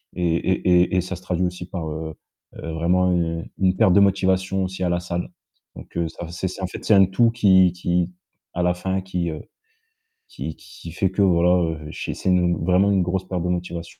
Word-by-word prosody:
et 85 -2 +1
et 90 0 +2
et - - +3
et - - +3
ça 90 +1 -5
se - - -15
traduit 90 0 -1
aussi 90 0 -5
par, 85 -4 -4
heu, 80 0 -6 0.4
vraiment, 85 +3 0
heu, 85 -1 -1 0.2
une 95 -1 +2
perte 90 - +4
de 100 - +6
motivation 95 -1 +1
aussi 95 0 -5
à 90 - +1
la 85 0 0
salle, 85 0 -4 0.5
donc - - -13
heu, 85 -1 0
ça, 85 - -8
c'est 90 +2 -3
c'est, 95 - -8
en - - 0
fait, - - -9
c'est 110 - +4
un 95 -1 +7
tout 115 +5 +2
qui 95 -6 +5
qui 90 0 -1 0.4
à 90 - -2
la 90 0 +2
fin 95 +1 -2
qui, 90 -2 -3
heu, 75 - -7 0.9
qui 80 - -6
qui 85 0 -12
fait 95 +1 0
que, 100 - 0
voilà, 90 -1 +4 0.2
heu, 80 - -8
j'ai - - -5
c'est 95 - -2
une, 90 -2 +2
vraiment, 95 +2 +3
une 95 -2 +3
grosse 95 +1 -2
perte 90 -2 -3
de 90 - -1
motivation. 85 -1 -4
90 Hz, 225 wpm, -22 LUFS, 85-95 Hz, 0.9 s, un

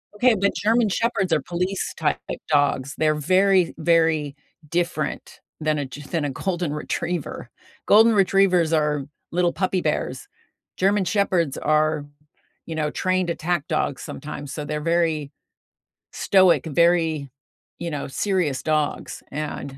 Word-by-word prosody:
Okay, 240 +1 +4
but 200 +1 +2
German 225 +1 +2
Shepherds 195 -4 0
are 150 - +2
police 180 +5 -3
type 150 -2 0
d - - -3
dogs. 145 -2 +2
They're 155 -1 +2
very, 185 +3 +3
very 160 -3 +2 0.3
different 170 -2 -2 0.2
than 155 -1 0
a 140 - -2
Ge 145 +2 -10
than 160 0 -2
a 145 - -1
Golden 175 +2 -2
Retriever. 150 -3 -4 0.4
Golden 225 +2 +6
Retrievers 190 -4 +3
are 150 -3 +1 0.3
little 175 0 +1
puppy 185 -1 0
bears. - - -2 0.5
German 195 0 +2
Shepherds 180 -8 +1
are, 155 0 +1 0.6
you 165 - -5
know, 150 -1 -1
trained 185 +1 0
attack 170 -2 -2
dogs 155 -3 -1
sometimes, 145 0 -7
so 150 0 -5
they're 150 +1 -3
very 165 -3 0 0.8
stoic, 185 -3 +3
very, 160 -2 +2 0.5
you 170 -1 -4
know, 145 -1 -4
serious 160 -4 -1
dogs, 155 -1 -1
and, 140 -2 -5
165 Hz, 135 wpm, -23 LUFS, 150-185 Hz, 0.8 s, Golden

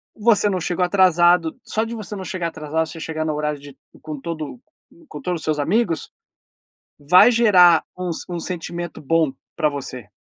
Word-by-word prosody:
Você 210 -2 +3
não 185 -2 -1
chegou 180 +1 0
atrasado, 175 -3 +3
só 220 - -1
de 230 +1 -5
você 210 -1 -7
não 190 - -6
chegar 180 -2 -3
atrasado, 160 0 -2
você 165 0 -9
chegar 155 0 -4
no 155 - -1
horário 150 -1 -2
de 140 -1 -13 0.3
com 155 -2 -6
todo 165 - -6 0.5
com - - -8
todos 175 -8 -3
os - - -10
seus 155 -1 0
amigos, 170 +1 0 0.9
vai 180 +10 +6
gerar 180 -8 +5
um 180 -1 -3
s 165 - -4
um 175 - -3
sentimento 175 -1 -5
bom 155 -1 +1 0.2
para 155 -3 +2
você. 130 -6 -7
170 Hz, 180 wpm, -21 LUFS, 155-185 Hz, 0.9 s, vai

